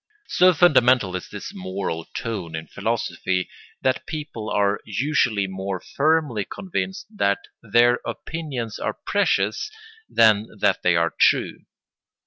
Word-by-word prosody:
So 185 +1 +5
fundamental 125 - +4
is 90 - -5
this - - -7
moral 95 -3 -4
tone 95 -8 -5
in 80 0 -5
philosophy 90 +3 -2 0.3
that 130 -1 0
people 145 -8 -5
are 100 0 +1
usually 115 -3 +1
more 95 0 -4
firmly 145 - +1
convinced 190 - -4
that 100 - +2 0.2
their 120 +2 +4
opinions 135 -9 -5
are - - -2
precious - - +1 0.4
than 110 -1 +4
that - - +2
they 90 -1 +3
are 85 0 +1
true. - - +2
110 Hz, 120 wpm, -23 LUFS, 95-140 Hz, 0.4 s, So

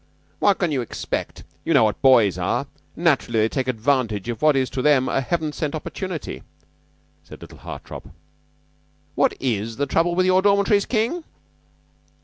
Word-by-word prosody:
"What 200 -2 +3
can 175 -4 0
you 135 -3 0
expect? 120 - -5 0.2
You - - +1
know - - +6
what 105 -1 0
boys 115 - +5
are. - - -1 0.3
Naturally 115 -2 +1
they 110 - +2
take 130 +1 -2
advantage 115 -4 0
of 120 - -4
what 155 0 +5
to 130 -1 -1
them 135 -2 +3
is - - -2
a 135 - +2
heaven 155 +3 -2
sent 150 0 -3
opportunity," 170 +1 -5 0.8
said 80 - -13
little - - -13
Hartopp. - - -9 1.0
"What - - +2
is 115 -3 -2
the 145 - 0
trouble 170 +5 +1
in 185 - +4
your 185 0 +4
dormitories, 200 0 +3
King?" 245 +9 -1
140 Hz, 160 wpm, -22 LUFS, 120-180 Hz, 1.0 s, know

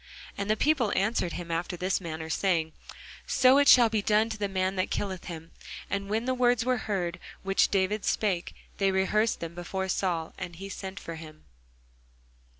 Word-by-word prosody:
And 200 +1 -4
the 215 - +2
people 275 -7 +2
answered 195 -4 0
him 170 -1 -6
after 175 +2 -2
this 185 +2 0
manner, 160 -2 -5
saying, 160 -1 0 0.5
So 265 +2 +5
shall 250 -4 +8
it 225 - 0
be 215 -2 +1
done 215 +2 +2
to 220 - -4
the 205 - 0
man 190 0 0
that 185 - 0
killeth 190 -3 -3
him. 165 -2 -8 0.4
And 200 0 -2
when 220 +3 0
the 260 - +1
words 245 -2 +2
were 255 0 +2
heard 175 -3 -1 0.2
which 195 0 +3
David 200 +2 0
spake, 190 -5 -1 0.2
they 195 -1 +3
rehearsed 200 +4 +1
them 165 0 -5
before 190 +2 -4
Saul: 175 -4 -1
and 180 -2 -6
he 195 +3 -8
sent 190 0 -6
for 165 -1 -7
him. 155 -1 -12
195 Hz, 185 wpm, -28 LUFS, 175-215 Hz, 0.5 s, shall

